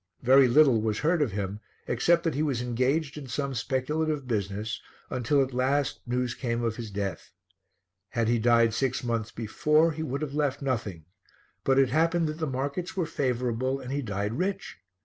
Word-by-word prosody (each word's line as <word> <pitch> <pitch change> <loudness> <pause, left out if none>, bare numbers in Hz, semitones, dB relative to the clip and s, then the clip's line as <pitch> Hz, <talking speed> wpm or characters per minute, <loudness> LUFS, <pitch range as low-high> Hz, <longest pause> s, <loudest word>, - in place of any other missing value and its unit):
Very 130 +2 +7
little 125 -3 +5
was 110 -1 -1
heard 165 +4 +1
of 125 -9 0
him, 100 0 -3 0.3
except 170 +8 +2
that 165 - 0
he 145 - -1
was 140 -6 0
engaged 130 +5 0
in 140 - -9
some 135 +3 -2
speculative 140 +4 -1
business, 105 -1 -2 0.3
until 135 +3 +2
at 130 -1 -5
last 135 +3 +1
news 125 0 -1
came 120 -2 -2
of 115 -1 0
his 115 -2 -6
death. 100 -4 -4 0.8
Had 115 -2 0
he 120 0 +2
died 115 0 +4
six 130 +2 -1
months 115 -2 -1
before, 150 +9 +2
he 155 +1 -5
would 145 -1 -3
have 145 -2 -4
left 145 -2 0
nothing, 110 - -3 0.6
but 135 0 +3
it 135 -2 +5
happened 165 +4 +2
that 155 +1 -6
the 160 - -1
markets 140 +8 -3
were 180 - +1
favourable 130 -3 -1
and 125 - -7
he 140 +1 -1
died 105 -2 -2
rich. 190 - -3
130 Hz, 185 wpm, -27 LUFS, 115-150 Hz, 0.8 s, Very